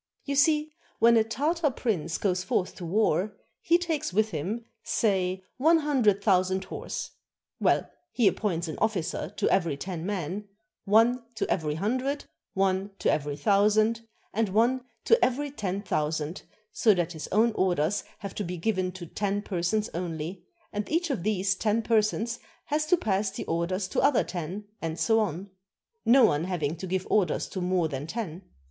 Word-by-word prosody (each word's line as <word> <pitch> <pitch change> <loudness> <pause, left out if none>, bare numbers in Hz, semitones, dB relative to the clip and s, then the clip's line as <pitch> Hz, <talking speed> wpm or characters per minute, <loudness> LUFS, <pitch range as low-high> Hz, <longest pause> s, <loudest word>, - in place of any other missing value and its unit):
You 280 - -2
see, 300 +2 +3 0.3
when 235 +1 +6
a 225 - +5
Tartar 295 +8 0
prince 180 - -2
goes 185 -2 0
forth 185 0 0
to 175 - -6
war, 200 +1 +1 0.3
he 340 - +4
takes 330 - -2
with 215 +3 +2
him, 195 +9 -3 0.2
say, 190 -3 0
one 320 +6 +5
hundred 250 -10 +2
thousand 190 -1 +2
horse. 190 - -5 0.5
Well, - - +2 0.2
he 235 -5 +3
appoints 180 -6 0
an 155 - -5
officer 195 -7 -1
to - - +1
every 165 -7 +2
ten 175 +1 -5
men, 195 +1 -3 0.4
one 225 +5 +4
to - - -1
every 150 -4 0
hundred, 260 - -1 0.3
one 190 0 +1
to - - +2
every 145 -1 -1
thousand, 210 +7 +3 0.3
and 220 -1 +1
one 235 +6 +2 0.2
to 460 +1 +5
every 280 +3 +1
ten 200 -6 -3
thousand, 155 -2 -2 0.3
so 215 -4 +4
that 175 -1 -1
his 155 -3 -6
own 225 +3 +3
orders 185 -2 +1
have 200 -3 -7
to 210 - -3
be 180 -1 -4
given 185 0 0
to 180 -1 -8
ten 205 +4 -2
persons 195 +3 0
only, 170 +1 -4 0.3
and 205 0 -3
each 330 0 +1
of 250 - -2
these 195 -1 +1
ten 215 +3 0
persons 225 +1 +1 0.3
has 305 +1 0
to 360 - +4
pass 200 - 0
the 195 - -6
orders 180 +3 -1
to - - 0
other 280 -4 +4
ten, 180 +4 -5 0.2
and 165 0 -3
so 225 -1 +3
on; 195 -2 -2 0.5
no 250 +1 +6
one 155 -5 +1
having 165 -5 -1
to 185 - -6
give 185 +1 -1
orders 195 -6 +2
to 185 - -4
more 180 -2 +1
than 145 0 -5
ten. 185 -3 -4
200 Hz, 170 wpm, -27 LUFS, 180-225 Hz, 0.5 s, when